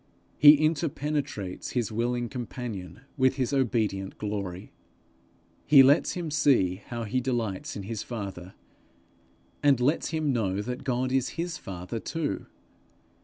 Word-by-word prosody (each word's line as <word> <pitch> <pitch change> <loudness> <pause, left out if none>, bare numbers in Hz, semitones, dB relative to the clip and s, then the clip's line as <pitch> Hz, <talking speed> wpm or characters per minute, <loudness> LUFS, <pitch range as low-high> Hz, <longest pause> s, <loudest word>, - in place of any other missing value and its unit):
He 145 +1 +10
interpenetrates 145 - -2
his 120 -5 -1
willing 120 +2 -1
companion 115 -4 -6 0.2
with 130 -1 +3
his 130 0 -1
obedient 110 -7 0
glory. 100 -4 -4 1.0
He 140 -3 +9
lets 140 +4 +4
him 170 -4 -4
see 110 -11 +2
how 120 -1 -4
he 125 +4 -1
delights 115 -7 -2
in 100 - -5
his 110 +1 -4
father, 95 -6 -7 1.1
and 140 -3 +4
lets 135 +6 +1
him 155 -3 0
know 100 -5 0
that 125 +4 -5
God 130 -1 -1
is 135 +2 0
his 175 +1 -3
father 95 +4 -6
too. 160 +4 -3
125 Hz, 130 wpm, -27 LUFS, 100-140 Hz, 1.1 s, He